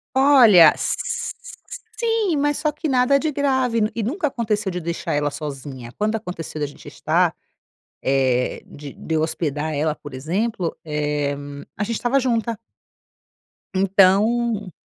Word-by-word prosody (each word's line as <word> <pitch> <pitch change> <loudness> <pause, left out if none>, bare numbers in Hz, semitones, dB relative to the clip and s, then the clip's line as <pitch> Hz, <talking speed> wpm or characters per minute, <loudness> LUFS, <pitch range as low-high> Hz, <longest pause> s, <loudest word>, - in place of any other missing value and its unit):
Olha, 240 - +7
s-sim! 455 -5 -3
mas 290 0 +1
só 300 - 0
que 305 +2 -4
nada 260 +2 +3
de 310 +1 -1
grave 260 -6 +1
e 230 - -1
nunca 300 - -1
aconteceu 215 -6 -2
de 180 - -3
deixar 170 -2 -3
ela 145 0 +1
sozinha. 135 -4 -7
Quando 215 +1 0
aconteceu 180 -7 -6
da - - +1
gente 145 - -14
estar, - - +1 0.7
eh, 130 -2 +1
de 145 -1 -10
de 160 - -5
eu 155 - +2
hospedar 155 -1 -2
ela, 150 +1 0
por 145 -3 -11
exemplo, 175 - -2
eh, 150 -2 -1 0.4
a 210 - -1
gente 230 +1 -2
estava 255 +3 +1
junta. 230 -3 -1 1.2
Então 200 +2 +3
200 Hz, 135 wpm, -22 LUFS, 150-250 Hz, 1.2 s, Olha